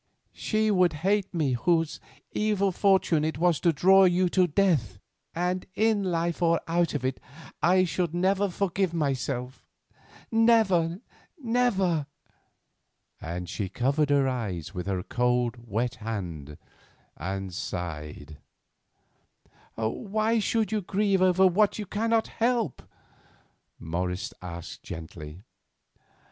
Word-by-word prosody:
"She 215 -1 0
would 180 -4 +3
hate 200 0 +2
me 155 -7 0
whose 165 +5 +1 0.3
evil 205 -2 +1
fortune 185 -5 +2
it 155 0 -1
was 170 -1 +2
to 170 - +3
draw 190 +6 +5
you 180 0 +3
to 180 0 +3
death, 150 - +1 0.4
and 180 +2 -1
in 220 -2 +2
life 170 -2 -1
or 170 -1 +3
out 170 -1 +1
of 130 -3 -2
it 130 0 -2 0.4
I 185 +2 +4
should 170 0 -1
never 190 +3 +1
forgive 185 -1 -1
myself—never! 165 - -1 0.4
never!" 205 - +1 1.1
and 90 +2 -5
she 100 0 -4
covered 140 - 0
her 140 -2 +3
eyes 95 - -3
with 90 -1 -5
her 95 -2 -1
cold, 125 -1 0
wet 115 +4 -1
hand 85 -10 -6 0.6
and 95 0 -5
sighed. 75 -4 -6 1.4
"Why 215 - 0
should 220 0 0
you 215 -1 0
grieve 195 0 +1
over 185 0 +4
what 200 +3 +3
you 210 - -4
cannot 225 +3 0
help?" 230 - -1
asked - - -27 0.9
Morris 90 +6 -3 0.5
gently. 80 +1 -9
170 Hz, 115 wpm, -27 LUFS, 115-195 Hz, 1.4 s, draw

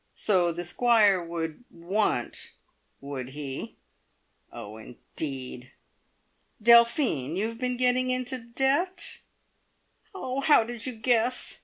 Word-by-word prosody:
(So 180 -5 +2
the 175 +1 -5
Squire 205 -1 +3
would 165 +3 -5
"want," 170 - -2 0.5
would 135 -2 -6
he? 140 -1 -7 0.8
Oh, 105 +1 -9
indeed!) 130 +2 -7 0.9
"Delphine! 235 - +4
you 200 +4 0
have 230 +1 -5
been 250 -1 -1
getting 255 0 +2
into 255 0 -1
debt?" 270 +10 0 1.0
"Oh, 260 -7 -3
how 295 -4 +5
did 235 +1 -6
you 255 - -3
guess?" 240 +2 +1
220 Hz, 110 wpm, -27 LUFS, 160-250 Hz, 1.0 s, how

